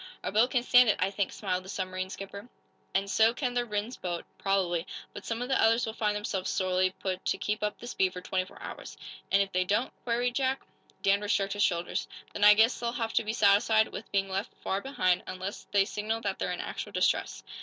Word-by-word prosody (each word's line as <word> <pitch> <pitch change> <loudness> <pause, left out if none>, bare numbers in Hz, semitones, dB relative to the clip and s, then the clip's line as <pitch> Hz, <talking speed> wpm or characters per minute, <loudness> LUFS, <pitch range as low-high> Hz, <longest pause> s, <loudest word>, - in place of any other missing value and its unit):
"Our - - -2
boat 220 +5 +4
can 250 -2 +1
stand 245 -1 +6
it, 210 - +3
I 185 +1 0
think," 200 -1 -1
smiled 185 -3 -2
the 190 - -11
submarine 185 -1 -3
skipper. 200 +4 -8 0.5
"And 195 +1 +2
so 220 +4 +4
can 250 -2 -1
the 245 0 0
Rhinds 210 +3 -3
boat, 175 -2 -4
probably. 185 -3 0 0.3
But - - -9
some 230 +1 -2
of - - -4
the 265 - +2
others 230 +2 +4
will 220 - -4
find 210 -2 0
themselves 195 -2 -2
sorely 185 -1 +1
put 185 -1 -3
to - - +2
to - - -7
keep 210 +1 -2
up 210 0 -1
the - - -10
speed 190 -6 0
for 180 - -5
twenty 185 0 -1
four - - -15
hours." - - -8 0.3
"And, 200 0 +5
if 195 - -9
they 185 0 +2
don't?" 205 +7 0
queried 245 +1 0
Jack. 265 +1 0 0.4
Danvers 200 +1 +2
shrugged 195 0 +1
his 205 - -3
shoulders. 175 -3 0 0.3
"Then 205 - -2
I 210 0 +9
guess 225 +3 +4
they'll 235 -1 -1
have 230 -2 -2
to - - +2
be 215 0 -2
satisfied 220 +1 +4
with - - -8
being 195 -1 +1
left 195 +1 -3
far 195 +1 -1
behind, 185 -9 +1
unless 185 +2 -6
they 200 -1 +4
signal 220 +2 -3
that 200 -3 -2
they're - - -1
in 180 - -3
actual - - -6
distress." - - 0
205 Hz, 235 wpm, -29 LUFS, 190-225 Hz, 0.5 s, I